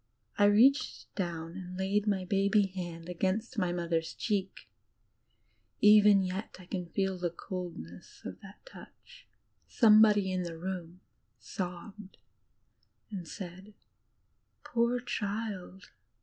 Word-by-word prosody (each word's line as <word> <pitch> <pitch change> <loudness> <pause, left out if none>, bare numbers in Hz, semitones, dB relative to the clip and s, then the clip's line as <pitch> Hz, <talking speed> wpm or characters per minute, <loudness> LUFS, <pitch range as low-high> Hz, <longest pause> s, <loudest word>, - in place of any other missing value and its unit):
I 205 - +4
reached 250 +9 +3
down 170 -3 -4
and 180 -1 -7
laid 200 +2 0
my 190 -3 0
baby 200 +2 +3
hand 175 -3 -6
against 185 +5 -1
Mother's 170 -3 -1
cheek. 195 -3 -2 1.1
Even 210 -1 +7
yet 190 +3 -4
I 185 - -13
can 180 -1 -4
DigilizedbyLTOOgle - - -26
feel 190 -1 0
the 175 -1 0
coldness 170 - -8
of 95 - -7
thai 195 +1 -12
touch. - - -15 0.4
Somebody 210 -3 +5
in 185 0 -1
the 170 -2 -5
room 180 0 -6 0.4
sobbed 190 +2 -7 0.9
and 185 -5 -6
said, 190 +3 -9 0.9
"Poor 235 +1 +1
child." 205 -5 -4
190 Hz, 115 wpm, -31 LUFS, 175-210 Hz, 1.1 s, Even